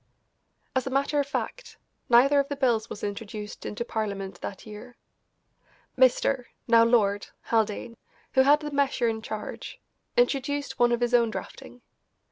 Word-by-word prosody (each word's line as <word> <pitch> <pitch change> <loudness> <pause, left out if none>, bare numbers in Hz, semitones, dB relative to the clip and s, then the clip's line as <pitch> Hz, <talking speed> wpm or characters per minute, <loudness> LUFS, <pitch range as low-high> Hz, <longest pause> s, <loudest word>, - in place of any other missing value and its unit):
As 260 0 0
a - - 0
matter 280 +2 +1
of 285 - 0
fact, - - -5 0.3
neither 270 +4 +6
of 280 - +1
the 285 - -2
bills 235 -5 +1
was - - -8
introduced 210 0 -6
into 220 +3 -4
Parliament 200 -5 -4
that 195 - -7
year. 220 +3 -11 1.0
Mr. 260 0 +3 0.2
(now 230 -1 +6
Lord) 205 -4 +2 0.2
Haldane, 225 +1 -1 0.4
who 265 - +5
had 290 +3 +5
the 300 -1 -5
measure 275 -4 +1
in 220 -1 -2
charge, 215 -1 -7 0.4
introduced 285 - 0
one 240 0 +4
of 240 0 0
his 240 0 0
own 235 -2 +4
drafting. 245 +2 -9
240 Hz, 150 wpm, -27 LUFS, 220-275 Hz, 1.0 s, neither